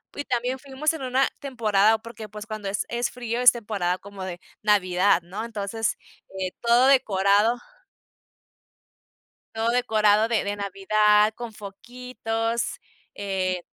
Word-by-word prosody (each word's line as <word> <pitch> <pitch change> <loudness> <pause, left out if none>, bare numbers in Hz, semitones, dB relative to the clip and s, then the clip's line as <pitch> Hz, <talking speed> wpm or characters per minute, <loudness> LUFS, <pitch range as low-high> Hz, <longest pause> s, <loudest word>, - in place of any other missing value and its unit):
y 285 - -4
también 250 +2 -1
fuimos 280 +3 -1
en 320 - -6
una 260 +1 +2
temporada, 220 -5 +2
porque, 225 -1 -9
pues, 210 +1 -8
cuando 215 -2 -6
es 205 - -2
es 235 0 -1
frío 240 -1 -4
es 250 - +9
temporada 205 -6 -2
como 200 0 -10
de 175 -2 -6 0.2
Navidad, 195 -2 +3
¿no? 185 +6 -6
Entonces, 225 0 -3 0.4
eh, 185 -1 -2
todo 240 +2 +4
decorado 210 -3 +3 2.0
todo 225 +1 0
decorado 220 -3 +3
de 230 -2 +1
de 200 0 -2
Navidad, 210 +2 +3
con 235 -1 -7
foquitos, 225 +2 -4 0.4
eh, 185 -3 -2
215 Hz, 130 wpm, -25 LUFS, 200-240 Hz, 2.0 s, es